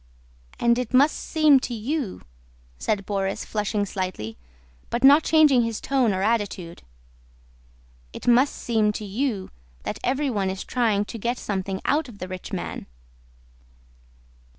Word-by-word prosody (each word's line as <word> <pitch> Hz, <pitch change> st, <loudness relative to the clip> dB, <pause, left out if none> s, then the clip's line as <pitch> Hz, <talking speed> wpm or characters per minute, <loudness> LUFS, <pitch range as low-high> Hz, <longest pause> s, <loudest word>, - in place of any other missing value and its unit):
"And 235 Hz, +1 st, +3 dB
it 250 Hz, 0 st, -2 dB
must 285 Hz, +4 st, +5 dB
seem 305 Hz, -4 st, +4 dB
to 245 Hz, -1 st, -4 dB
you," 240 Hz, -1 st, -3 dB, 0.6 s
said 200 Hz, -2 st, -1 dB
Borís 195 Hz, -1 st, -2 dB
flushing 210 Hz, -1 st, -1 dB
slightly, 185 Hz, -, -4 dB, 0.5 s
but 240 Hz, +2 st, -2 dB
not 285 Hz, +3 st, +8 dB
changing 305 Hz, -6 st, +5 dB
his 230 Hz, -2 st, -2 dB
tone 260 Hz, -5 st, +1 dB
or 190 Hz, 0 st, -1 dB
attitude, 205 Hz, -6 st, -1 dB, 1.3 s
"it -, -, -9 dB
must 250 Hz, +4 st, +4 dB
seem 220 Hz, -3 st, +1 dB
to 210 Hz, -, -5 dB
you 205 Hz, -1 st, -2 dB, 0.3 s
that -, -, -4 dB
everyone 255 Hz, -8 st, 0 dB
is 190 Hz, 0 st, -4 dB
trying 220 Hz, -5 st, +1 dB
to 230 Hz, -, -8 dB
get 240 Hz, +4 st, -1 dB
something 190 Hz, -1 st, -3 dB
out 295 Hz, -2 st, +1 dB
of 220 Hz, -, -12 dB
the 185 Hz, -, -6 dB
rich 185 Hz, -1 st, -7 dB
man?" -, -, -5 dB
225 Hz, 140 wpm, -24 LUFS, 195-260 Hz, 1.3 s, not